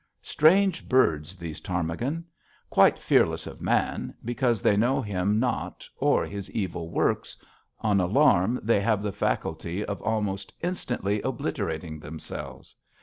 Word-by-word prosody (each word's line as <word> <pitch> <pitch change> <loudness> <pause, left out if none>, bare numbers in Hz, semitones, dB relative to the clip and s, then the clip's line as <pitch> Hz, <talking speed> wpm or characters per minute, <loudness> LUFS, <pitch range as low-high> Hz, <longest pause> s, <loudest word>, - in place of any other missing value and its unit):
Strange 185 +4 +3
birds, 85 - +2
those 85 -4 -7
ptarmigan. 90 - -2 0.5
Quite - - +5
fearless - - +2
of - - -9
man, - - 0
because 120 -1 +1
they 100 - +3
know 120 +6 +2
him 105 -2 0
not 125 +1 -2
or - - +2
his 100 -1 -6
evil 85 -5 -3
works, - - 0 0.4
on 105 -3 +2
alarm 110 +2 +3
they 110 -2 +3
have 105 -1 +1
the 105 - -1
faculty 90 0 -2
of 100 - -4
almost 105 -3 -2
instantly 120 - -2
obliterating 80 -1 -3
themselves. 80 +1 -8
100 Hz, 130 wpm, -26 LUFS, 90-120 Hz, 0.5 s, Quite